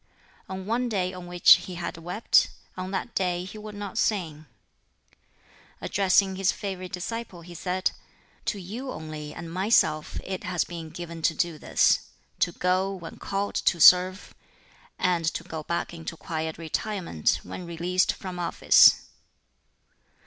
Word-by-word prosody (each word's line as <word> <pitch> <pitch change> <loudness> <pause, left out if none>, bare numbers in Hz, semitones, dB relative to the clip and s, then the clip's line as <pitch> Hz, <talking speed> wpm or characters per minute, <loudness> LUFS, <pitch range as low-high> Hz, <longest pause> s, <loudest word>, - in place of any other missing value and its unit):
On 190 0 -5
one 240 +3 0
day 185 -4 -1
on 180 -1 -9
which 175 0 +6
he 185 - -6
had 170 0 -4
wept, 175 +7 +2 0.3
on 185 0 -5
that 200 +5 -4
day 180 -2 0
he 210 +3 -9
would 210 0 -9
not 205 -2 -4
sing. 160 -7 -1 1.3
Addressing 190 0 +2
his 195 -1 +2
favorite 185 -2 -6
disciple, 195 0 -5
he 175 +1 -11
said, 185 +2 -1 0.5
"To 210 - -1
you 230 +9 -6
only 155 -3 -7
and 165 +2 -8
myself 185 -5 +2
it 190 0 -5
has 180 -2 0
been 165 -2 -8
given 170 0 -8
to 160 0 +2
do 165 0 -1
this - - +3 0.4
to 175 - +2
go 185 +3 +1
when 170 -3 -9
called 200 +1 -3
to 170 - +1
serve, 185 +3 +6 0.6
and 180 -2 +1
to - - -4
go 160 -1 -6
back 170 +2 -3
into 165 0 -7
quiet 160 -2 -4
retirement 170 - -1
when 180 - -8
released 175 +2 +1
from 185 -2 -7
office." 175 - +6
180 Hz, 150 wpm, -26 LUFS, 170-195 Hz, 1.3 s, which